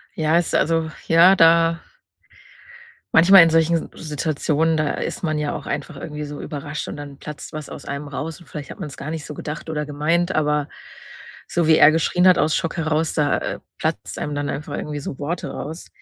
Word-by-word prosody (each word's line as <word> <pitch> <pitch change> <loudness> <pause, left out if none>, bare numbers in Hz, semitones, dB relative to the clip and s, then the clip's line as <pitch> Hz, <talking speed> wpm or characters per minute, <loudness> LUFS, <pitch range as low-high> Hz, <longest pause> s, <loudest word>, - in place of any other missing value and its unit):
Ja, 160 +1 +2
ist 175 - 0
also 165 0 +1 0.2
ja, 170 +4 +7
da 165 -1 +5 1.4
manchmal 175 +2 +9
in 165 - +3
solchen 165 +1 +1
S 165 - -10
Situationen, 155 +1 0
da 155 -1 0
ist - - -4
man 155 -3 -1
ja 150 -1 -1
auch 145 - -7
einfach 165 - -4
irgendwie 150 +1 -6
so 145 0 -7
überrascht 145 0 -5
und - - -6
dann 145 -1 -9
platzt 150 -1 -9
was 155 -1 -6
aus - - -9
einem 140 +1 -5
raus 155 +4 -5
und 170 - -17
vielleicht 150 -1 -8
hat - - -11
man's 150 -7 -7
gar 150 - -5
nicht 160 -2 -5
so 150 - -7
gedacht 150 +2 -6
oder 150 -1 -2
gemeint, 165 +5 0
aber 150 -2 +1 0.8
so 170 -2 0
wie 160 -1 +6
er 150 - +8
geschrien 170 +3 +2
hat 185 - +6
aus 155 0 +2
Schock 165 - -2
heraus, 160 -1 0
da, 150 -2 +2
äh, - - -4 0.2
platzt - - -3
einem 150 - -3
dann 145 0 -2
einfach 145 +2 -4
irgendwie 150 -1 -4
so 135 - -7
Worte 165 +4 -3
raus. 160 +4 -7
155 Hz, 205 wpm, -22 LUFS, 150-165 Hz, 1.4 s, manchmal